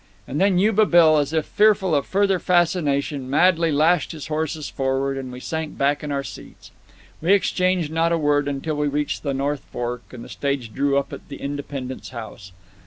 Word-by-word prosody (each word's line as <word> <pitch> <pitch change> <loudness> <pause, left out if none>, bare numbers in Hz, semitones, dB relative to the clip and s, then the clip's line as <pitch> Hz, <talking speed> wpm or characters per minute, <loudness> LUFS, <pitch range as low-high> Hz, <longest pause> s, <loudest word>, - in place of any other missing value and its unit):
And 145 +6 -2
then 195 -2 +3
Yuba 210 +2 +3
Bill, 160 -3 +6
as 145 0 -1
if 160 -1 0
fearful 205 -4 +3
of 140 -2 +1
further 195 -1 +2
fascination, 150 -7 +1
madly 165 +2 +3
lashed 155 +4 +2
his 155 -1 -8
horses 155 0 -2
forward, 135 0 -1
and 130 -2 -6
we 125 - -8
sank 160 +3 -5
back 140 +2 +1
in 150 - -4
our 140 -1 -1
seats. - - -11 0.5
We 175 +5 +4
exchanged 185 -4 +1
not 165 +1 +1
a 170 - +2
word 145 -2 +1
until 145 +2 -3
we 150 0 0
reached 145 +1 -2
the 140 -2 -2
North 140 0 -1
Fork, 120 0 -3
and 120 -2 -9
the - - -10
stage 140 -6 -3
drew 140 0 +1
up 140 - -2
at - - -10
the - - -6
Independence 140 -2 -6
House. 110 -5 -9
145 Hz, 195 wpm, -22 LUFS, 140-170 Hz, 0.5 s, Bill